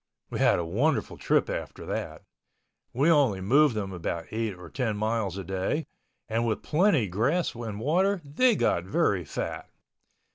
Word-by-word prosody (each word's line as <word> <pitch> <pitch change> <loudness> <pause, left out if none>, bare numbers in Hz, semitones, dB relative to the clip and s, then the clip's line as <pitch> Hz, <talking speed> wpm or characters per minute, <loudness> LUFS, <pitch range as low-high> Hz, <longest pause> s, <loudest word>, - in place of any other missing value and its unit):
We - - -3
had - - +4
a 85 - -2
wonderful 120 - 0
trip - - +1
after - - -5
that. - - -4 0.7
We 140 +7 +3
only 135 -11 +3
moved 130 +7 +4
them 100 -3 -3
about 85 -1 -3
eight 110 -2 -2
or 90 -1 -11
ten 115 0 -2
miles 110 -3 -1
a 95 - -4
day 95 - -2 0.4
and 115 +1 0
with 115 -2 -1
plenty 160 - +3
grass 125 - 0
and 115 -3 -6
water 185 - +2
they 230 - +3
got 85 - +1
very 100 - +1
fat. 75 - -5
115 Hz, 160 wpm, -27 LUFS, 95-150 Hz, 0.7 s, had